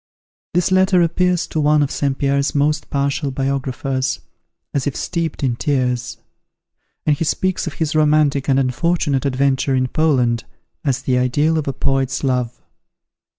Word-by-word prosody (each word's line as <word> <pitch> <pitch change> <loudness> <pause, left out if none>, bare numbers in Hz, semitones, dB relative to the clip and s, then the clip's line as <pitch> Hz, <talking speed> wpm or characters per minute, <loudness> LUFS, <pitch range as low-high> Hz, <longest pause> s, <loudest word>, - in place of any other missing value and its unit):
This 180 +1 +2
letter 185 -1 +4
appears 180 +1 +1
to 155 - -3
one 150 0 +3
of 140 - -2
St. 140 -2 -1
Pierre's 140 +1 0
most 150 +2 +1
partial 140 +1 -1
biographers, 135 -1 -2 0.5
as 140 0 -1
if 140 - -2
steeped 165 -4 -3
in 125 -3 +1
tears; 125 -3 -1 0.9
and 150 - +3
he 155 - -2
speaks 185 +3 -1
of 155 - -4
his 155 -2 -2
romantic 150 -2 +2
and 135 - +4
unfortunate 140 +1 0
adventure 135 0 +1
in 130 0 +1
Poland, 125 -6 +1 0.4
as 135 -3 -1
the 125 -2 +1
ideal 145 +6 +1
of 155 -2 -1
a 135 - -1
poet's 135 0 -1
love. 125 -3 -1
140 Hz, 150 wpm, -19 LUFS, 130-155 Hz, 0.9 s, letter